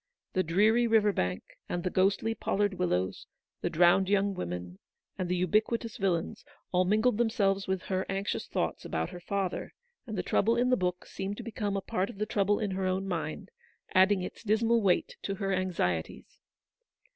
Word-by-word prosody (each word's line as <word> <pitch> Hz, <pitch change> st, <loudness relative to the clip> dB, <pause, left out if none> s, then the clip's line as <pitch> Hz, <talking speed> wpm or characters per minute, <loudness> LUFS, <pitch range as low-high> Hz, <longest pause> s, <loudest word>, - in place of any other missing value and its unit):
The 185 Hz, -, +2 dB
dreary 210 Hz, +8 st, +3 dB
river 215 Hz, -2 st, +4 dB
bank, 90 Hz, -, -1 dB, 0.3 s
and 175 Hz, -1 st, -2 dB
the 180 Hz, -, -1 dB
ghostly 195 Hz, +4 st, +2 dB
pollard 205 Hz, -2 st, 0 dB
wil 180 Hz, -1 st, 0 dB
lows, 90 Hz, +1 st, -1 dB, 0.3 s
the -, -, 0 dB
drowned 175 Hz, +3 st, +4 dB
young 200 Hz, 0 st, +2 dB
women, 90 Hz, -, -5 dB, 0.4 s
and 185 Hz, -2 st, -3 dB
the 180 Hz, 0 st, 0 dB
ubiqui 215 Hz, +5 st, +2 dB
tous 230 Hz, -2 st, -8 dB
villains, 180 Hz, -4 st, -1 dB, 0.3 s
all 180 Hz, 0 st, +3 dB
mingled 215 Hz, +4 st, +2 dB
themselves 200 Hz, -5 st, +1 dB
with 190 Hz, -1 st, -1 dB
her 190 Hz, -1 st, -2 dB
anxious 195 Hz, +1 st, -2 dB
thoughts -, -, -2 dB
about 80 Hz, 0 st, -2 dB
her 175 Hz, -, -8 dB
father; 190 Hz, 0 st, -3 dB, 0.3 s
and 215 Hz, -3 st, -4 dB
the 180 Hz, -, -1 dB
trouble 225 Hz, +6 st, +2 dB
in 250 Hz, +1 st, +2 dB
the -, -, +6 dB
book 180 Hz, -2 st, -2 dB
seemed 195 Hz, +1 st, -5 dB
to -, -, -6 dB
become 205 Hz, -3 st, -2 dB
a -, -, -2 dB
part 195 Hz, -2 st, -1 dB
of -, -, -9 dB
the 210 Hz, -, -1 dB
trouble 205 Hz, -1 st, +1 dB
in 210 Hz, -3 st, -1 dB
her 190 Hz, 0 st, -1 dB
own 190 Hz, +1 st, -1 dB
mind, 165 Hz, -, -4 dB, 0.4 s
adding 190 Hz, 0 st, +4 dB
its -, -, -7 dB
dismal 225 Hz, +2 st, +2 dB
weight 190 Hz, -3 st, +1 dB
to 195 Hz, -, -3 dB
her 195 Hz, 0 st, -1 dB
anxieties. 170 Hz, -, -2 dB
195 Hz, 190 wpm, -30 LUFS, 180-210 Hz, 0.4 s, the